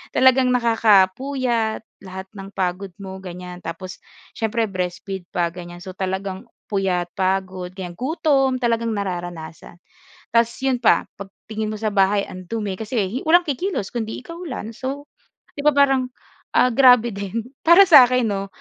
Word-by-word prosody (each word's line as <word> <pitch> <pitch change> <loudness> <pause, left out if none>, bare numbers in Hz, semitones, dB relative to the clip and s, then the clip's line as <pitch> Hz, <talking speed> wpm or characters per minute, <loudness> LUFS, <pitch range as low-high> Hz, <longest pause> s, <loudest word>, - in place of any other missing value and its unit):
Talagang 260 0 +5
nakakapuyat 230 +1 +2 0.2
lahat 190 +1 -7
ng 195 -1 -10
pagod 185 0 -3
mo, 190 0 -7
ganyan. 180 -1 -8
Tapos 180 +2 -7 0.3
siyempre 225 +1 -1
breastfeed 185 0 -4
pa 170 -2 +1
ganyan. 175 0 -10
So 185 - -7
talagang 190 0 -4 0.2
puyat, 185 -3 0
pagod, 185 -1 -1
ganyan, 180 -3 -7
gutom, 270 -2 +1
talagang 230 -1 +1
nararanasan. 175 -5 -6 0.6
Ta's 230 0 +4
'yon 265 -1 +1
pa 240 - +3
'pag 195 0 -10 0.2
tingin 215 0 -3
mo 215 - -6
sa 220 - -1
bahay, 200 0 +2
ang 185 0 -9
dumi 210 0 -4
kasi 220 +2 -2
walang 345 +2 +4
kikilos 290 - -2
kundi 220 -2 -4
ikaw 335 +6 -10
lang. 240 -8 -6
So 275 +4 -5 0.5
'di 285 - -3
ba, 300 - +5
parang, 270 -2 +3 0.5
ah, 250 - +4
grabe 245 -1 +6
din 200 +4 -5 0.2
para 340 +4 +9
sa'kin 255 -6 +7
'no, 195 -1 -2
210 Hz, 150 wpm, -21 LUFS, 185-250 Hz, 0.6 s, para